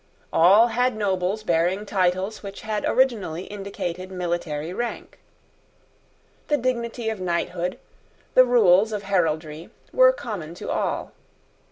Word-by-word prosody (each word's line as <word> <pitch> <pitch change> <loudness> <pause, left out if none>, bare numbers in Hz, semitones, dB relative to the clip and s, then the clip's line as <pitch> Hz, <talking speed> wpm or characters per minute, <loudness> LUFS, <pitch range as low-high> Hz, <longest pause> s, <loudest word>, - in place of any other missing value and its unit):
All 200 +8 +6
had 245 -1 0
nobles 195 0 -1
bearing 175 +3 +1
titles 190 +1 0
which 200 -1 -8
had 215 -1 -3
originally 210 -10 +1
indicated 190 -3 -6
military 175 -3 -3
rank. 240 +4 -5 1.3
The 295 - +2
dignity 235 -2 -2
of 215 -4 -6
knighthood, 175 0 -2 0.6
the 255 - +8
rules 220 -4 +4
of 205 -1 -3
heraldry, 160 -4 -1 0.2
were - - +7
common 200 - -6
to - - -6
all. - - -2
195 Hz, 120 wpm, -24 LUFS, 175-220 Hz, 1.3 s, the